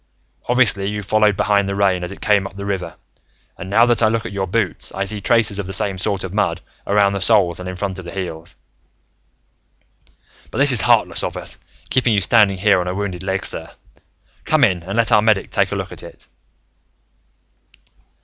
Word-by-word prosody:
Obviously, 110 -6 +4
you 105 0 -5
followed 105 0 +2
behind 100 -1 +1
the 100 - -2
rain 95 -3 +1
as 90 - -4
it 100 - -11
came 100 -2 +2
up 95 - -15
the 100 0 -7
river. 95 -4 -4 0.6
And 90 - -9
now 115 +4 +4
that 120 -1 +1
I - - +4
look 115 +1 -1
at - - -6
your 95 -1 -3
boots, 105 0 -2
I 100 - -3
see 105 +1 -4
traces 110 -2 +1
of 100 - -4
the 95 - -6
same 95 -1 -2
sort 100 0 -2
of 95 -1 -6
mud, 105 -1 0 0.3
around 100 -1 +2
the 100 - -3
soles 95 -4 +2
and 90 0 -6
in 90 - -6
front 95 0 -4
of 90 - -10
the 85 - -8
heels. 85 -3 -7 1.9
"But - - -8
this 140 +1 +5
is 125 - +4
heartless - - +2
of - - -4
us, - - -8 0.3
keeping 125 -3 +2
you - - +3
standing 100 -1 +3
here 100 -1 +3
on 90 - -5
a 90 - -3
wounded 95 -3 -4
leg, 95 0 -2
sir. - - -3 0.7
Come 155 -2 +2
in, 95 -8 +2
and 95 +6 -6
let 115 -2 +2
our 105 - +5
medic 105 -2 +1
take - - 0
a - - -2
look - - -5
at - - -9
it." - - -13
100 Hz, 210 wpm, -19 LUFS, 95-105 Hz, 1.9 s, this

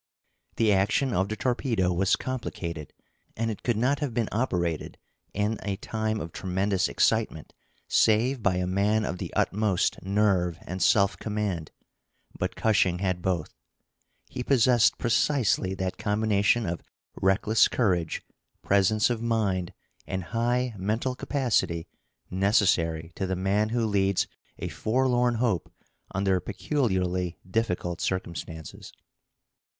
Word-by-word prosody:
The 110 -2 +3
action 105 +7 +2
of 95 +2 +1
the 110 - -2
torpedo 115 -7 0
was 95 +2 +3
complicated, 85 - -5 0.5
and 115 0 0
it 105 - -7
could 120 -3 0
not 130 +5 +1
have 140 -6 -3
been 115 -3 0
operated 90 - -1 0.3
in 105 +2 -1
a 100 -2 -2
time 110 +1 -2
of 85 - -6
tremendous 95 +1 0
excitement - - 0 0.3
save 115 +4 +3
by 100 -3 +2
a 90 0 0
man 100 +4 +1
of 90 - -4
the - - -5
utmost 105 -3 +1
nerve 95 -3 +1
and 95 +1 -5
self 100 -1 +4
command; 105 -7 -2 0.7
but - - -3
Cushing 100 -5 +2
had 90 -1 -1
both. 85 -4 -1 0.7
He - - -6
possessed 125 -3 +4
precisely 115 -5 +1
that 95 -1 -3
combination 105 +1 +2
of 85 -1 -3 0.4
reckless 95 +3 +4
courage, 90 -9 0 0.4
presence 100 +3 +3
of 115 -2 -2
mind, 105 -6 0 0.4
and 95 -1 -3
high 120 +1 +1
mental 110 +7 -1
capacity 120 - 0 0.4
necessary 90 -4 +2
to 95 - -3
the 95 - -1
man 100 +3 +1
who 115 0 0
leads 100 -2 +2 0.3
a - - -4
forlorn 125 +1 +1
hope 110 -7 0 0.4
under 95 -1 +1
peculiarly 90 - -1
difficult 90 -4 -1
circumstances. 85 -3 -5
100 Hz, 125 wpm, -27 LUFS, 90-115 Hz, 0.7 s, self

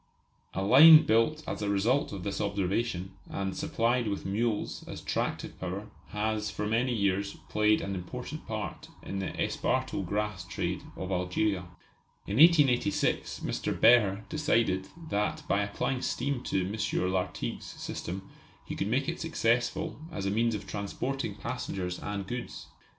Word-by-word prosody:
A 95 - 0
line 155 +9 +9
built 135 +8 +2
as - - -4
a 105 - -1
result 110 +8 +2
of 95 -3 -6
this 100 +1 -2
observation, 100 -1 -1 0.2
and 95 -1 -3
supplied 120 +1 +1
with 100 -1 -3
mules 105 +2 -1
as - - -6
tractive - - -3
power, 95 +3 -5 0.2
has 105 0 -1
for 105 - -3
many 115 +4 +1
years 100 -3 0
played 105 0 +3
an 100 - -3
important 90 -2 -6
part - - -5 0.2
in 95 - -4
the 95 - -2
esparto 130 -5 0
grass 105 0 -2
trade 85 - -3 0.2
of 95 0 -4
Algeria. 90 +1 0 0.6
In 100 - -2
1886 150 -2 +4
Mr. - - -2
Behr 105 -4 +5
decided 115 -11 +1 0.2
that 105 +1 0
by 100 - +2
applying 105 +5 -1
steam 135 0 -1
to 95 -1 0
M. 95 -2 -1
Lartigue's 95 -1 -2
system 95 +2 -6 0.4
he - - -5
could 100 - -1
make 130 +6 +1
it 170 +1 -2
successful 155 +1 0
as 95 - -4
a 100 - +1
means 115 +2 +2
of 105 -1 -6
transporting 105 +8 -3
passengers 90 -2 -4
and 100 -1 -4
goods. 120 +4 -6
105 Hz, 150 wpm, -30 LUFS, 95-120 Hz, 0.6 s, line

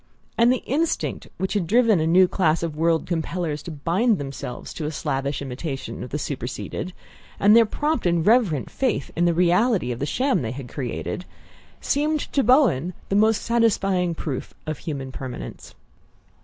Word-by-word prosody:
And 235 +1 +5
the 255 - 0
instinct 315 +6 -1
which 190 - -2
had 200 -5 0
driven 230 -2 +4
a 160 - +1
new 180 +3 +6
class 170 -3 +1
of 165 -3 -3
world 165 +1 +1
compellers 165 -2 -2
to - - -8
bind 180 +10 +1
themselves 135 -3 -6
to 150 -2 -3
slavish 140 -1 -2
imitation 135 -2 -5
of 125 - -7
the 150 - -2
superseded, 125 - -4 0.5
and 205 +2 +6
their 230 -1 +6
prompt 295 - 0
and 170 -1 +1
reverent 210 - +3
faith 225 - -1
in 175 - +2
the 170 - +3
reality 180 - +3
of 120 - -4
the 140 - -2
sham 260 - +1
they 115 -1 -3
had 130 -1 -7
created, 135 +7 -4 0.6
seemed 300 +1 +1
to 275 - +3
Bowen 215 - +3
the 195 - 0
most 215 +1 +3
satisfying 195 -7 +1
proof 140 -5 -5
of 155 0 -4
human 135 -4 -5
permanence. 130 -2 -8
170 Hz, 170 wpm, -23 LUFS, 140-220 Hz, 0.6 s, new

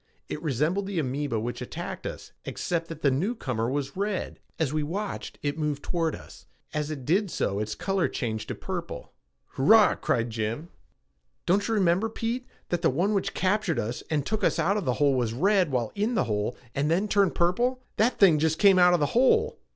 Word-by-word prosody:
It 150 - -4
resembled 160 - 0
the 200 -2 -4
amoeba 135 -4 -1
which 120 +3 -4
had - - -6
attacked - - -6
us, - - -8
except 170 -1 -2
that 165 -2 -9
the 140 - +4
newcomer 130 - -1
was 140 0 -3
red. 200 0 -2 0.2
As 155 -4 0
we 155 - +1
watched, 195 +8 -4
it 145 +2 -2
moved 150 -2 -2
toward 165 -3 -1
us. - - -14 0.3
As 150 0 -2
it 140 -5 -6
did 190 - +2
so 100 -10 -1
its 105 0 -3
color 190 0 0
changed 110 -4 -3
to - - -4
purple. - - -6 0.4
"Hurrah!" 215 +10 +5
cried 115 0 -1
Jim. 115 +9 -3 0.8
"Don't 200 +3 +2
you 225 - 0
remember, 190 +2 +2
Pete, 235 +3 -3 0.2
that 175 -1 -1
the 165 - +4
one 180 +10 +1
which 195 - -1
captured 190 -2 +1
us 115 +4 -2
and 150 -3 0
took 215 -1 -2
us - - +2
out 195 +3 +2
of 210 - -2
the 125 - +1
hole 140 +1 +3
was 120 -4 0
red 185 - +3
while 120 -4 -1
in 215 +4 -1
the - - +3
hole 105 0 -2 0.2
and 145 +2 0
then 185 +6 +2
turned 200 -2 +2
purple? 240 +10 +1 0.2
That 230 +4 +2
thing 170 -7 +6
just 160 +1 +1
came 195 -1 +6
out 180 0 +6
of - - 0
the 145 - +2
hole!" 440 - +3
165 Hz, 205 wpm, -27 LUFS, 135-200 Hz, 0.8 s, thing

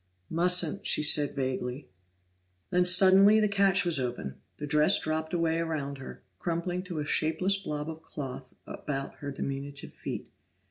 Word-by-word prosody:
"Mustn't," 175 -1 +2
she - - +2
said 150 -1 +3
vaguely. 130 0 -3 0.8
Then 180 0 +3
suddenly 190 +3 +6
the 215 - +3
catch 200 -1 +2
was 170 -5 +2
open; 120 - -4 0.2
the 150 - -5
dress 150 +6 +4
dropped 160 0 -2
away 165 -1 0
around 145 -4 -3
her, 135 - -10 0.2
crumpling 175 +1 -2
to 175 -3 -6
a 150 - -2
shapeless 180 +6 +1
blob 150 -6 -4
of 160 0 -7
cloth 135 -4 -8
about 135 -2 -5
her 145 - -6
diminutive 140 0 -5
feet. - - -6
160 Hz, 150 wpm, -29 LUFS, 140-180 Hz, 0.8 s, suddenly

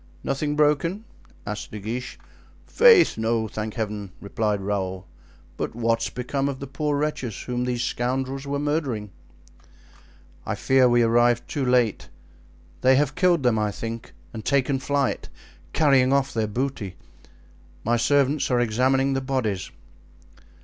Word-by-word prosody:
"Nothing 145 +2 -1
broken?" 150 +8 +1 0.4
asked 105 +1 -5
De 105 - -7
Guiche. 115 +5 -5 0.5
"Faith, 460 - +5
no, 110 0 0
thank 110 0 -5
Heaven!" 105 -4 -4
replied 105 0 -1
Raoul; 95 -1 -3 0.5
"but - - -3
what 115 -1 +1
has - - -1
become 135 +3 -2
of 135 -2 -5
the 140 - -5
poor 150 0 -2
wretches 140 -7 -3
whom 125 0 -2
these 125 -1 -1
scoundrels 130 +3 -2
were 140 0 -1
murdering?" 140 -8 -2 1.3
"I - - -3
fear 130 -1 +4
we 120 0 +4
arrived 120 +1 +3
too 145 - -2
late. 125 -4 +1 0.7
They 130 +1 +5
have 140 0 +2
killed 180 -4 +2
them, 120 -3 +3
I 105 -1 +1
think, 115 +2 -6 0.2
and 110 -2 -6
taken 140 -1 +1
flight, 140 0 -1 0.4
carrying 135 -4 +4
off 140 0 +1
their 110 -2 0
booty. 110 -4 -3 0.9
My 120 +2 +2
servants 140 +3 +2
are 125 -2 +2
examining 130 +4 +2
the 135 - -1
bodies." 130 -8 -2
125 Hz, 140 wpm, -24 LUFS, 110-140 Hz, 1.3 s, Faith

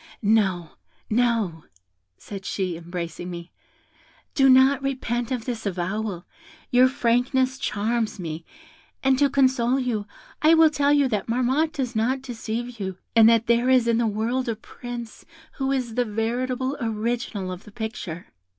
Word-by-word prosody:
'No, 195 -6 +2 0.4
no,' 220 -8 +1 0.5
said 195 -2 -8
she, 185 -3 -2
embracing 170 +1 -6
me, 170 -1 -8 0.8
'do 270 -1 +5
not 265 +1 +6
repent 245 -3 -2
of 250 -4 -3
this 235 -3 -4
avowal, 190 0 -3 0.5
your 250 +1 +6
frankness 260 +1 +1
charms 220 +1 -1
me; 165 -2 -5 0.6
and 265 -1 +3
to 285 -1 +4
console 260 -2 +2
you, 225 -5 -2 0.3
I 315 +2 +6
will 320 -1 +6
tell 285 -1 +2
you 285 -2 +4
that 210 -4 -2
Marmotte 260 +7 +1
does 255 -5 -3
not 255 +5 0
deceive 235 -1 -5
you, 190 -2 -4 0.2
and 225 -1 +8
that 230 -1 +3
there 235 +2 +2
is 255 -2 +4
in 230 0 +3
the 235 - +2
world 230 +4 -1
a 225 - -1
Prince 240 +1 -8 0.3
who 270 -1 0
is 255 -4 -1
the 245 +2 +2
veritable 245 +4 -2
original 225 -3 -2
of 180 +1 -7
the 210 - -14
picture.' 205 -6 -6
235 Hz, 150 wpm, -24 LUFS, 210-260 Hz, 0.8 s, and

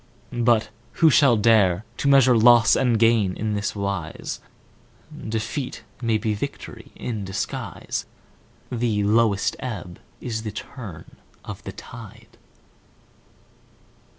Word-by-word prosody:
But 120 -2 +2 0.2
who 160 -2 +5
shall 135 -5 +5
dare 105 -3 +3
To - - -1
measure 135 -3 +6
loss 115 0 +6
and 125 -3 +2
gain 110 -4 +3
in 110 0 -2
this 105 +1 -2
wise? 100 -5 -4 0.9
Defeat 115 +5 -3 0.2
may 115 -2 +2
be 110 0 -1
victory 105 - -7
in 110 -4 -4
disguise; 95 0 -4 0.6
The 115 -4 0
lowest 105 -1 +2
ebb 100 -8 -6 0.2
is 110 -2 -4
the 110 -1 -5
turn 100 - -9 0.3
of - - -8
the - - -5
tide. - - -12
110 Hz, 115 wpm, -23 LUFS, 100-120 Hz, 0.9 s, measure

